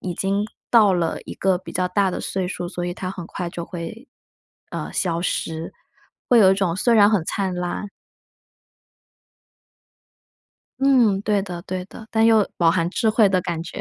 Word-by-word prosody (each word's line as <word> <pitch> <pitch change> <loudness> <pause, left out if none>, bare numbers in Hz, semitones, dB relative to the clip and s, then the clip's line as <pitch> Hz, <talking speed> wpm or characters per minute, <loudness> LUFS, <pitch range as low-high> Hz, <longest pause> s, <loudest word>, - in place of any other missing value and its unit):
已 180 -2 -4
经 200 +3 -1 0.2
到 215 -5 +6
了 170 -2 -1
一 - - -7
个 190 -2 +1
比 185 - -11
较 185 0 0
大 190 +1 +1
的 - - -4
岁 185 -2 -2
数， 180 - -4
所 175 -1 -4
以 175 - -3
他 185 0 -5
很 180 -3 -7
快 175 0 -5
就 170 - -6
会， 185 - -8 0.6
呃， - - -5
消 170 -3 -1
失， 165 -2 -3 0.6
会 245 - +7
有 190 -3 +7
一 - - +2
种 190 -4 0
虽 235 +5 +2
然 210 -1 +6
很 200 -6 +2
灿 190 -2 -2
烂。 180 +3 -4 2.9
嗯， 250 -8 +4
对 210 -1 +1
的 175 -3 -7
对 185 0 -4
的。 220 - -12
但 225 0 +3
又 220 -3 +5
饱 170 -2 +4
含 170 -1 +1
智 225 +3 0
慧 215 -1 +4
的 185 -1 +2
感 170 -2 -3
觉。 170 - -7
190 Hz, 195 characters per minute, -22 LUFS, 175-210 Hz, 2.9 s, 会